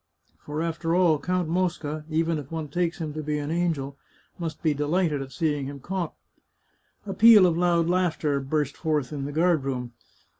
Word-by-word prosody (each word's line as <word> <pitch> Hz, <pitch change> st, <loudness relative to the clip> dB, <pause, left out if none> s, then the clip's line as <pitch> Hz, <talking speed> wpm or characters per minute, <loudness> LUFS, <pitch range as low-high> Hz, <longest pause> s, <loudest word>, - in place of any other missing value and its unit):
For, 150 Hz, +2 st, -4 dB
after 165 Hz, 0 st, -1 dB
all. 170 Hz, -5 st, +4 dB
Count 180 Hz, +2 st, -1 dB
Mosca, 160 Hz, -3 st, -2 dB
even 165 Hz, 0 st, 0 dB
if 140 Hz, -2 st, -9 dB
one 160 Hz, -2 st, -4 dB
takes 175 Hz, +2 st, -1 dB
him 155 Hz, -3 st, -4 dB
to 155 Hz, -, -4 dB
be 150 Hz, 0 st, -2 dB
an 145 Hz, +1 st, -3 dB
angel, 155 Hz, -5 st, -1 dB, 0.4 s
must 165 Hz, -1 st, -5 dB
be 155 Hz, -2 st, +3 dB
delighted 150 Hz, +1 st, 0 dB
at 135 Hz, 0 st, -7 dB
seeing 145 Hz, 0 st, -1 dB
him 140 Hz, 0 st, -7 dB
caught." 180 Hz, +3 st, -4 dB, 0.9 s
A 195 Hz, -, -4 dB
peal 220 Hz, -3 st, +8 dB
of 170 Hz, -2 st, +2 dB
loud 170 Hz, -1 st, +2 dB
laughter 165 Hz, -5 st, +1 dB
burst 145 Hz, +1 st, -1 dB
forth 150 Hz, -4 st, -1 dB
in 140 Hz, -2 st, -3 dB
the 145 Hz, -, -4 dB
guard 165 Hz, -1 st, +2 dB
room. 125 Hz, -3 st, -4 dB
155 Hz, 185 wpm, -26 LUFS, 145-175 Hz, 0.9 s, peal